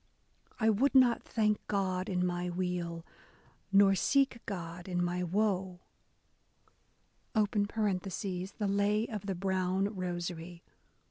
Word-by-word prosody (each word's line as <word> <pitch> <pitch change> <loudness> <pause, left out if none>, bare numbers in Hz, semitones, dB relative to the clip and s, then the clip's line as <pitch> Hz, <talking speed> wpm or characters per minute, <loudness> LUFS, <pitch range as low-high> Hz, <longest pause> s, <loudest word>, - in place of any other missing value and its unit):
/ - - -31
would 225 +5 +3
not 250 -3 +6
thank 215 -1 +1
God 190 -2 -1
in 180 -1 +1
my 175 0 -1
weal, 175 -2 -3 0.7
nor 195 0 +6
seek 265 +4 +2
God 175 -3 -6
in 180 -1 -1
my 175 +1 -1
woe, 190 -1 0 1.6
(The 205 -3 -1
Lay 205 +2 +2
of 210 -2 -6
the 195 - -1
Brown 190 +2 0
Rosary.) 175 -1 -5
190 Hz, 110 wpm, -32 LUFS, 180-210 Hz, 1.6 s, not